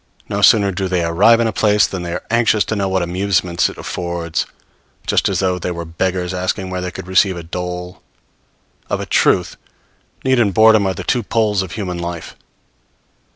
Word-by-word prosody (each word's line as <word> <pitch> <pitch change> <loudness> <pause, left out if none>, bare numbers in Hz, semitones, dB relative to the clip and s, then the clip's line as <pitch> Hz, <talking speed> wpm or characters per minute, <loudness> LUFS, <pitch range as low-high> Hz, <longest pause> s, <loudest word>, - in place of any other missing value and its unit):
No - - -2
sooner 100 -3 +5
do 95 +1 -2
they 90 -2 0
arrive 100 +8 +4
in 115 - +2
a 110 - -1
place 105 0 +3
than 95 - -5
they 85 -1 -5
are 90 - -4
anxious 115 -3 +3
to 110 - -2
know 100 -2 -1
what 95 -1 0
amusements 90 -1 0
it - - -11
affords; 85 -2 -3 0.6
just - - +2
as - - -1
though 90 -1 0
they 90 - -3
were 85 -1 -5
beggars 90 +2 -2
asking 95 +1 -2
where 90 0 -3
they 90 - -3
could 90 - -8
receive 95 0 +2
a 85 - -7
dole! 90 +2 -6 0.9
Of - - -1
a - - -4
truth, - - +2 0.7
need 130 -1 +3
and 100 -5 +1
boredom 110 -2 +5
are 95 - -1
the - - -6
two 125 - 0
poles 105 -2 0
of 95 -2 -6
human 90 -5 -4
life. 85 -1 -6
95 Hz, 200 wpm, -18 LUFS, 90-105 Hz, 0.9 s, sooner